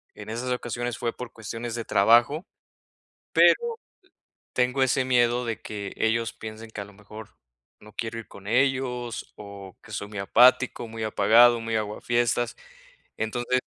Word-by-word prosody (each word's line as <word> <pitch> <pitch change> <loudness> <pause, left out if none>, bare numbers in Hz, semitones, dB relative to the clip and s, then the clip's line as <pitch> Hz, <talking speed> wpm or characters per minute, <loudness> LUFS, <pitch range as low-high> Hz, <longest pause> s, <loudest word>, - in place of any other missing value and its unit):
en - - -10
esas 120 +3 -3
ocasiones 120 -1 -3
fue 120 -1 -2
por 125 -2 -7
cuestiones 115 +1 -6
de 115 -1 -4
trabajo. 120 - +4 0.9
Pero - - +7 1.0
tengo 125 +2 +2
ese 130 0 +2
miedo 120 -1 +2
de 115 -1 -4
que 100 -2 -6
ellos 115 +1 +1
piensen 110 +1 -9
que, 105 - -6
a - - -6
lo 100 - -16
mejor, 105 +1 -11 0.5
no 105 0 -15
quiero 115 0 -4
ir 115 - -10
con 100 0 -13
ellos 125 -1 0
o 100 -2 -11
que 110 - -14
soy 100 0 -4
muy 105 - -8
apático, 125 +3 +4
muy 110 0 -6
apagado, 115 +3 +5
muy 115 0 -2
aguafiestas. 120 +3 0 0.6
Entonces, 120 +3 0
115 Hz, 155 wpm, -26 LUFS, 110-120 Hz, 1.0 s, Pero